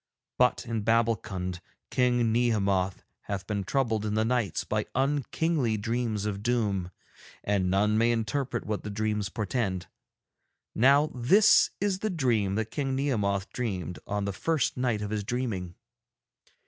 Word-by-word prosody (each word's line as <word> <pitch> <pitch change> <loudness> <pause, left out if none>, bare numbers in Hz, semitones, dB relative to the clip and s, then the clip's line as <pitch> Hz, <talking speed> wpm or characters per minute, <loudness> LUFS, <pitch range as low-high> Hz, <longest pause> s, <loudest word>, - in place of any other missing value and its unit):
But 125 -1 +3
in 115 -2 -2
Babbulkund 105 -5 0 0.3
King 120 -2 +2
Nehemoth 100 -5 +1 0.2
hath 100 -1 -4
been 100 0 -2
troubled 115 -1 0
in 105 0 -1
the 110 0 +2
nights 120 -3 0
by 105 0 -2
unkingly 140 -2 0
dreams 110 -1 -2
of 100 -2 -3
doom, 105 -6 0 0.5
and 100 -3 +1
none 105 +3 +2
may 115 +1 +4
interpret 120 +2 -2
what 105 -1 -2
the 105 - -5
dreams 105 -1 -1
portend. 105 -4 -2 0.9
Now 140 +6 +4
this 160 - +5
is 195 -1 0
the 215 - -1
dream 120 - +1
that 110 0 -2
King 135 -3 -1
Nehemoth 105 -8 -1
dreamed 95 - -3
on 100 0 -1
the 100 - -2
first 160 +8 0
night 120 -5 0
of 105 - -4
his 105 -1 -1
dreaming. 100 -7 -3
110 Hz, 145 wpm, -28 LUFS, 100-125 Hz, 0.9 s, this